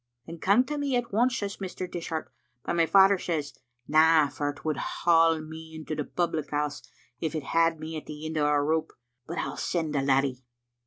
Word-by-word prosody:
' 120 0 -53
*Then 165 0 -9
come 200 +9 +4
to 295 +3 -4
me 280 -3 0
at 245 -4 -2
once,' 235 +3 +2
says 200 -1 -4
Mr. 185 -1 -5
Dishart; 165 -4 -5 0.3
but - - -1
my 165 -1 +3
father 195 +3 +6
says, 150 -6 -3 0.3
*Na, 155 -1 +5
for 145 +1 -2
it 145 +2 -9
would 155 -2 0
haul 165 -1 +3
me 160 +1 -10
into 155 0 -6
the 150 -1 -2
public 160 -2 -2
house 145 0 -2
as - - -22 0.3
if 160 0 -3
it 155 - -2
had 165 +2 +2
me 160 +1 -6
at 155 - -9
the 150 +1 -7
end 160 0 -4
o' 150 -1 +2
a 145 -1 +3
rope, 160 +1 0 0.3
but 170 +3 -5
I'll - - -3
send 160 -4 -1
the 140 - +1
laddie.' 135 -1 +1
160 Hz, 220 wpm, -27 LUFS, 150-175 Hz, 0.3 s, father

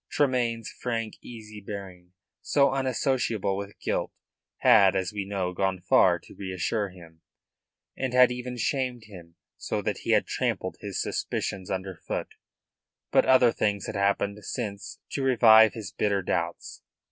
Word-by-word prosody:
Tremayne's 120 -5 0
frank, 115 -3 -4
easy 110 -3 -10
bearing, 95 -3 -9 0.3
so 140 -1 +3
unassociable 130 -6 0
with 100 +1 -7
guilt, - - -2 0.5
had, 100 -3 +6
as 95 +1 -1
we 100 -2 -3
know, 95 -2 -2
gone 95 0 -1
far, 90 0 +4
to - - -16
reassure 100 +2 -2
him, 85 -3 -15 0.7
and 130 -2 -2
had 125 0 +6
even 125 0 -5
shamed 125 -1 -1
him, 90 -6 -13 0.2
so - - -3
that - - -2
he - - -8
had - - +3
trampled - - -2
his - - -5
suspicions 95 -2 -3
underfoot. 95 -2 -4 0.8
But - - +4
other 130 -2 +6
things 100 -4 -1
had - - -5
happened 100 +1 0
since 105 -4 -5
to 140 - -2
revive 110 -4 +6
his 105 -4 -7
bitter 100 -2 0
doubts. 85 -1 -3
105 Hz, 145 wpm, -27 LUFS, 95-120 Hz, 0.8 s, had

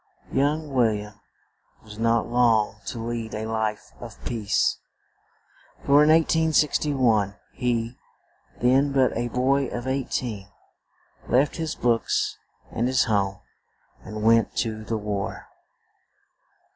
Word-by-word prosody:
Young 145 +2 0
Wil 115 -4 +3
liam 105 0 -8 0.6
was 105 -1 -12
not 115 0 +2
long 115 -4 +2
to - - -4
lead 115 -1 -4
a 110 +1 -4
life 110 -1 -3
of - - -10
peace; 110 -4 0 1.1
for 140 +1 +6
in 150 - +4
1861 150 -9 +2 0.2
he, 120 -1 -2 0.6
then 135 +3 +3
but 135 -2 +2
a 120 +1 -1
boy 130 +3 +1
of 120 0 -5
eight 130 0 -1
een, 105 -5 -6 0.8
left 135 +7 +2
his 160 -2 -3
books 120 -2 0 0.3
and 120 - 0
his 130 0 +3
home, 100 -3 0 0.6
and 110 -1 -6
went 115 +1 +3
to 110 -2 -2
the 110 +1 -2
war. 105 -2 -4
120 Hz, 120 wpm, -24 LUFS, 110-135 Hz, 1.1 s, for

